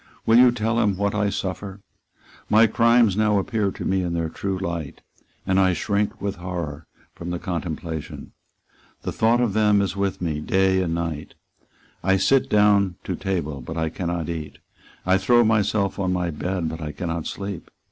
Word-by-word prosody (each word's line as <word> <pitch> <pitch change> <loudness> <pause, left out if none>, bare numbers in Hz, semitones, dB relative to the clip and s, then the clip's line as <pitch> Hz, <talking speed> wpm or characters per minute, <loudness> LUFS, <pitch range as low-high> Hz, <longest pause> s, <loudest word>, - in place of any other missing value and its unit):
Will 115 +1 +6
you 125 -1 +7
tell 115 -1 0
him 105 -5 +1
what 100 0 0
I 105 -1 +1
suffer? 95 +1 -4 0.7
My 110 +2 +6
crimes 115 -1 +4
now 105 -1 +2
appear 105 0 0
to - - -7
me 95 0 +1
in 85 -1 -2
their 85 -1 -1
true 95 +3 -3
light; 85 -5 -5 0.4
and 95 0 +2
I 95 -1 +4
shrink 100 +4 -1
with 100 0 -3
horror 85 -4 -5 0.3
from 85 - -7
the 90 - -2
contemplation. 85 -3 -5 0.7
The - - -2
thought 115 +2 +2
of 120 -5 +1
them 105 -1 +4
is 100 0 -1
with 100 -1 -1
me 80 -4 -2
day 95 +4 +2
and 85 -2 -1
night. 80 -3 -4 0.7
I 95 0 +3
sit 135 +8 +3
down 100 -3 +4
to - - -3
table; 75 -8 -3
but 80 +7 -7
I 80 -1 0
cannot 85 -1 -3
eat. 80 -3 -5 0.5
I 95 +1 +3
throw 120 +2 +4
myself 105 -2 +1
on 95 -2 0
my 90 -2 -1
bed; 90 +2 -2
but 80 +1 -5
I 75 -1 -5
cannot 85 -3 -3
sleep. 100 -4 -6
95 Hz, 180 wpm, -23 LUFS, 85-105 Hz, 0.7 s, you